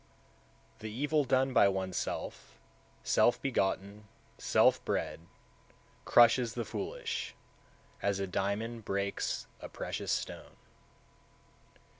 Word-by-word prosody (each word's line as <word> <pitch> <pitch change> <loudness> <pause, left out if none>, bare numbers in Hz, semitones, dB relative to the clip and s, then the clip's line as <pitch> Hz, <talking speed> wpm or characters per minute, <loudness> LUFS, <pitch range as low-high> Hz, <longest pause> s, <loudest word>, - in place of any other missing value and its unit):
161. 110 - -6
The 110 +4 -7
evil 150 +1 +2
done 130 +1 +2
by 100 - +6
oneself, 95 -9 -3 0.4
self 60 - +3
begotten, 100 -4 -1 0.3
self - - +4
bred, 80 +1 -2 0.8
crushes 120 0 +5
the 120 - -2
foolish, 460 +2 -4 0.7
as 100 -1 0
a 100 - 0
diamond 105 +5 -2
breaks 100 0 -2
a - - -8
precious - - -4
stone. - - -4
110 Hz, 100 wpm, -32 LUFS, 95-130 Hz, 0.8 s, by